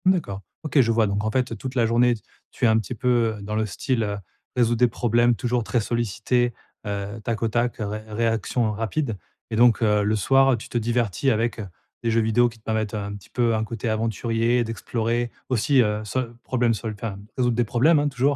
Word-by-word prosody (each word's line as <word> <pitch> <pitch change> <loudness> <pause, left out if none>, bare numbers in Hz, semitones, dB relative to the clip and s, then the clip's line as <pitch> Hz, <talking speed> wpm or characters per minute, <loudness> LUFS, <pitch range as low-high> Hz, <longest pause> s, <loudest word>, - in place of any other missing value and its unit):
D'accord. 170 - +1 0.2
OK 155 -2 +2
je 115 -2 +2
vois. 115 -1 +3
Donc, 100 +1 -1
en 110 - 0
fait, 130 0 0
toute 130 -1 -6
la 120 -3 +3
journée, 120 +1 +3
t 110 - -13 0.3
tu - - -1
es - - +6
un 110 0 +4
petit 115 +3 -5
peu, 120 -2 +1
heu, - - -10
dans 105 +2 -4
le 110 0 +1
style, 115 +5 -1
heu, 100 -1 -2 0.4
résoudre 120 -2 +2
des 125 - +6
problèmes, 120 +1 +2
toujours 120 0 -1
très 120 - 0
sollicité, 120 +2 0 0.3
heu, 100 +1 -4
tac 115 0 -2
au - - +3
tac, 120 +2 0
ré 105 0 -4
réaction 115 +1 0
rapide. 115 +2 -2 0.3
Et - - -1
donc, 120 0 +5
heu, 105 -2 +3
le 105 +2 +1
soir, 135 +4 +4
tu 110 - -10
te - - -1
divertis 120 +1 0
avec 115 0 0 0.4
des 115 - +1
jeux 115 0 +3
vidéos 115 +2 +3
qui 115 - -15
te 110 - -27
permettent 110 -2 -1
un 100 -1 -4
petit 100 -3 -13
peu 120 -2 +1
un 110 - 0
côté 115 +1 -4
aventurier, 115 +2 +1
d'explorer 115 +1 -2 0.2
aussi, 130 +2 +3
heu, 105 -1 0
sol 120 +2 -3
problème 120 -2 +1
sol 110 0 -4
enfin, 105 -2 -5 0.2
résoudre 125 -2 +2
des 120 - +2
problèmes, 135 +8 +3
hein, 145 - +1
toujours, 135 +2 +1
115 Hz, 220 wpm, -24 LUFS, 110-120 Hz, 0.4 s, es